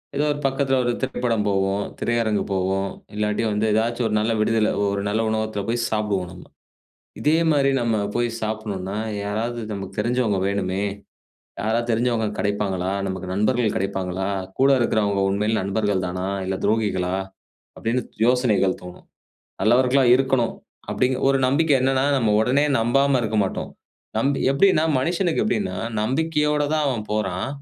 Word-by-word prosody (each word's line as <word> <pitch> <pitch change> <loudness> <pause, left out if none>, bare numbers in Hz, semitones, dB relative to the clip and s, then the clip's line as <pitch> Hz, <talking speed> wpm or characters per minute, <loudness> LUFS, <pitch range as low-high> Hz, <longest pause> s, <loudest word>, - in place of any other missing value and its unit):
ஏதோ 145 +2 +1
ஒரு 145 - -3
பக்கத்துல 135 0 +1
ஒரு 120 - +1
திரைப்படம் 115 -4 -1
போவோம், 95 0 +1 0.2
திரையரங்கு 115 -3 0
போவோம். 95 +1 0 0.3
இல்லாட்டி 105 +1 0
வந்து 105 +1 0
ஏதாச்சும் 115 +2 0
ஒரு 105 - -1
நல்ல 110 +2 0
விடுதியில 110 0 +2 0.2
ஒரு 100 0 -1
நல்ல 110 +2 0
உணவகத்துல 110 -2 -2
போய் 120 +1 0
சாப்டுவோம் 105 -4 -1
நம்ம. - - -12 0.7
இதே 155 +2 +3
மாரி 140 -2 +3
நம்ம 115 -2 +1 0.2
போய் 120 0 +1
சாப்டணுனா, 105 -3 -3 0.3
'யாராவது 110 +4 -2
நமக்கு 95 -1 -6
தெரிஞ்சவங்க 120 -2 +1
வேணுமே. 100 -1 -1 0.8
யாராவது 115 +3 0
தெரிஞ்சவங்க 115 -1 +1
கிடைப்பாங்களா 100 -3 -1 0.2
நமக்கு 95 -1 -4
நண்பர்கள் 110 +2 +1
கிடைப்பாங்களா, 95 -1 -2 0.3
கூட 135 +1 +5
இருக்கிறவங்க 105 -4 +1
உண்மையில 105 +3 0
நண்பர்கள் 100 -1 0
தானா 90 +1 -3 0.2
இல்ல, 95 - -1
துரோகிகளா?' 100 -4 0 0.6
அப்டின்னு 120 +3 -1 0.2
யோசனைகள் 120 -7 +2
தோணும். 90 0 -11 0.6
நல்லவர்களா 125 +5 +4
இருக்கணும் 130 -3 +1 0.4
அப்டிங்கிற, 130 0 0
ஒரு 135 0 +3
நம்பிக்கை. 145 +3 +3
என்னனா, 130 0 +2
நம்ம 115 -5 +2
உடனே 130 +6 +2
நம்பாம 135 +4 +3
இருக்க 110 -1 -1
மாட்டோம். 95 - -4 0.5
நம்பி 140 +4 +1
எப்டின்னா 155 +3 +4 0.2
மனிஷனுக்கு 170 +5 0
எப்டின்னா 205 -1 -1 0.2
நம்பிக்கையோட 150 +5 +1
தான் 155 -1 +1
அவன் 120 -5 -2
போறான். 95 -1 -1
110 Hz, 140 wpm, -23 LUFS, 100-130 Hz, 0.8 s, கூட